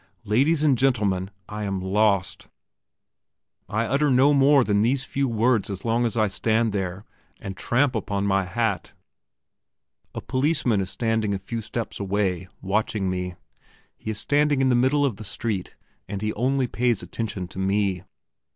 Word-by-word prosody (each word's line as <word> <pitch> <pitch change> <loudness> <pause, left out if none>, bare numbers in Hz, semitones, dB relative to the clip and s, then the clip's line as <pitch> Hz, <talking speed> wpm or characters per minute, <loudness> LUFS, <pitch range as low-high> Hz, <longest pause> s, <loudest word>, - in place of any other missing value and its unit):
Ladies 140 +9 +2
and 140 -6 +3
gentlemen, 100 -8 +1 0.2
I 105 0 -6
am 100 -2 -2
lost! 100 0 +1 1.2
I 110 +2 0
utter 140 +5 +1
no 135 +3 +5
more 140 0 +5
than 100 -2 +2
these 125 +4 +1
few 135 0 -1
words 115 -2 +1
as 100 +1 -6
long 120 +1 +2
as 115 - -4
I 110 - +4
stand 110 +3 +1
there, 95 0 -3 0.3
and 95 -1 -6
tramp 125 +6 +1
upon 100 -3 -2
my 95 -1 +2
hat. 100 0 -2 1.2
A - - -2
policeman 130 -6 +1
is 95 - -3
standing 110 -3 0
a - - -1
few 115 +4 -5
steps 115 +1 -5
away, 95 -3 -1 0.2
watching 100 -1 0
me. 90 -1 -3 0.6
He - - -8
is 110 - -2
standing 145 +3 +2
in 135 -1 +3
the - - +3
middle 135 +4 +3
of 120 -8 -1
the 110 - -8
street, 105 -2 -3 0.3
and 100 +1 -5
he 105 - -1
only 130 +3 +1
pays 120 -4 0
attention 95 0 -4
to 95 - -8
me. 95 -1 0
110 Hz, 165 wpm, -24 LUFS, 100-125 Hz, 1.2 s, no